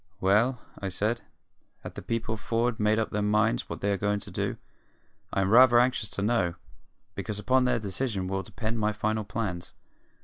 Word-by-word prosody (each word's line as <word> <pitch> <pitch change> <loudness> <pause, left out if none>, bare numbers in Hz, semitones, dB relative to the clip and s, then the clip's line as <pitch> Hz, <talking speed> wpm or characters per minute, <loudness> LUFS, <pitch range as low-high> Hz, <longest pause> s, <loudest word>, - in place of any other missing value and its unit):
"Well," 110 +7 +3 0.2
I 100 - -3
said, 110 +5 -1 0.6
"have - - -7
the - - -7
people 110 -1 -2
for'ard 115 +2 -1
made 105 +1 +3
up 110 - -1
their 105 - -1
minds 110 +3 +1
what - - -6
they 100 - +1
are 100 - 0
going 105 0 +1
to - - -10
do? - - -2 0.7
I 95 - +1
am 95 +1 +1
rather 120 0 +8
anxious 120 -4 +1
to 100 - -2
know, 95 -6 +1 0.6
because 105 -2 -4
upon 130 +4 +2
their 125 - +2
decision 105 -2 -2
will 95 +1 -1
depend 110 +3 -4
my 105 0 +1
final 110 +1 -1
plans." 95 -5 -4
110 Hz, 190 wpm, -28 LUFS, 100-115 Hz, 0.7 s, rather